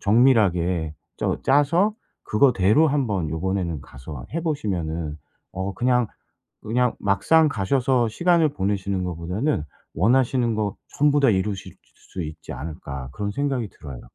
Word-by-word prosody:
정밀하게 95 - +3 0.2
쩌 - - 0
짜서 165 +10 +3 0.3
그거대로 120 +4 +4
한번 110 - 0
요번에는 85 -1 -2
가서 65 +1 -10
해 165 - 0
보시면은 85 - -2 0.4
어 95 +1 -4
그냥 125 +1 +2 0.5
그냥 125 +2 +1
막상 155 +11 +3
가셔서 125 +2 +1
시간을 170 +6 +3
보내시는 95 -1 -1
거보다는 90 - -1 0.3
'원하시는 120 - +2
거 105 -2 -1 0.2
전부 145 0 +4
다 135 - +5
이루실 95 0 -2
수 - - -36 0.3
수 90 - -3
있지 80 +1 -8
않을까.' 70 -5 -7
그런 100 0 -3
생각이 135 -3 -1
들어요. 70 -6 -10
100 Hz, 300 characters per minute, -23 LUFS, 90-130 Hz, 0.5 s, 다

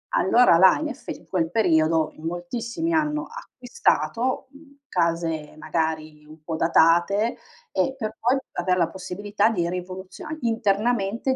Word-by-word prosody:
allora 210 -2 +5
là 185 +1 +6
in 310 - -2
eff - - -10
in - - -7
quel 165 -3 -1
periodo, 160 -6 +2
in 155 - -12
moltissimi 235 - -3
hanno 305 0 0
acquistato, 460 - -1
mhmm, 280 0 -18
case 165 -3 -1
magari 155 -1 -3
un 155 +1 -15
po' 160 +1 -4
datate 175 +7 +3 0.4
e 265 - 0
per 220 -3 -4
poi 250 +4 +2 0.2
aver 180 0 0
la 170 - +2
possibilità 200 +3 -1
di 175 -6 -1
rivoluziona 185 - -6
internamente 225 +1 0
190 Hz, 135 wpm, -24 LUFS, 165-240 Hz, 0.4 s, là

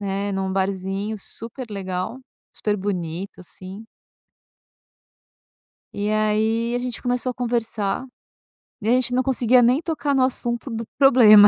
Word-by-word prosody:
né, 200 0 -2
num 190 0 -1
barzinho 195 +2 -1
super 230 +5 -7
legal, 190 +4 -3 0.3
super 210 -1 -1
bonito, 185 -1 -4
assim. 190 +4 -10 2.1
E 205 +1 -1
aí, 220 +2 +1
a - - +1
gente 245 -1 -4
começou 250 0 0
a - - -6
conversar. 230 -2 -1 0.8
E 215 - -3
aí 240 - +5
a - - +6
gente 245 0 -2
não 255 +1 +3
conseguia 250 -1 +4
nem 250 +6 +4
tocar 305 -4 -1
no 260 -1 +4
assunto 240 0 -1
do 230 0 -3
problema. 225 -7 +9
220 Hz, 140 wpm, -23 LUFS, 195-245 Hz, 2.1 s, problema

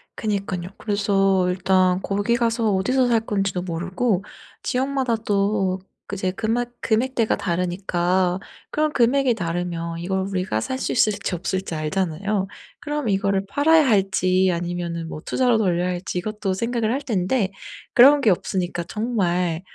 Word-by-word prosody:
그니깐요. 195 -4 -3
그래서 195 -3 +1
일단 185 0 +2
거기 205 +4 0
가서 230 -2 +1
어디서 250 +7 +2
살 230 -2 +3
건지도 195 -4 -1
모르고 185 +4 -1 0.4
지역마다 260 -2 0
또 200 -3 0 0.3
그 200 - -5
이제 185 -1 -1
금액 225 +4 -1
금액대가 230 0 +1
다르니까 180 0 0 0.3
그럼 305 0 +1
금액이 250 +1 +3
다르면 170 -2 -3
이걸 190 +3 -1
우리가 185 - -1
살 260 - -3
수 - - -2
있을지 205 -5 +1
없을지 185 0 -3
알잖아요. 190 +5 -1 0.3
그럼 295 -3 -3
이거를 195 -1 +1
팔아야 305 +5 +4
할지 190 -3 +2
아니면은 170 -1 -3
뭐 155 - -7
투자로 250 -3 +2
돌려야 180 -4 +1
할지 180 0 -4
이것도 205 0 -2
생각을 230 +1 -1
할 265 - 0
텐데 200 -3 0 0.4
그런 280 +4 +8
게 230 -7 +4
없으니까 180 -1 -1
정말 180 -6 -1
195 Hz, 325 characters per minute, -23 LUFS, 180-230 Hz, 0.4 s, 그런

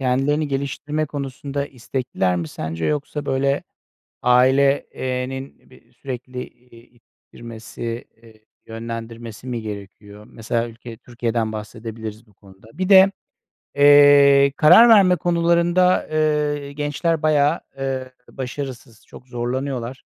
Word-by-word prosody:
kendilerini 135 +4 0
geliştirme 145 +2 -3
konusunda 140 0 -5
istekliler 120 -8 -2
mi 85 -2 -4
sence 80 +1 -5
yoksa, 150 0 -3
böyle, 140 +1 0 0.6
aile 130 +3 +3
eee, 125 0 -3
nin 135 +1 -9
bir 120 - -21
sürekli, 125 0 -7
eee, 120 -1 -20
i 120 +1 -24
ittirmesi, 115 0 -9 0.2
eee, 110 -1 -20 0.2
yönlendirmesi 115 +1 -8
mi 120 -2 -3
gerekiyor? 105 0 -10
Mesela 115 +1 -3
ülke 115 0 -11
Türkiye'den 115 -2 -3
bahsedebiliriz 110 0 -8
bu 105 - -25
konuda. 95 +1 -19
Bir 185 +1 -2
de, 195 0 +7 0.6
eee, 145 -1 +6
karar 180 +10 +7
verme 195 -5 +6
konularında, 175 +1 +2
eee, 150 -2 0
gençler 150 +2 -1
bayağı, 155 +1 +2 0.2
eee, 130 -1 -4 0.2
başarısız, 130 -3 -7
çok 130 - -15
zorlanıyorlar. 125 +1 -4
130 Hz, 115 wpm, -21 LUFS, 115-145 Hz, 0.6 s, de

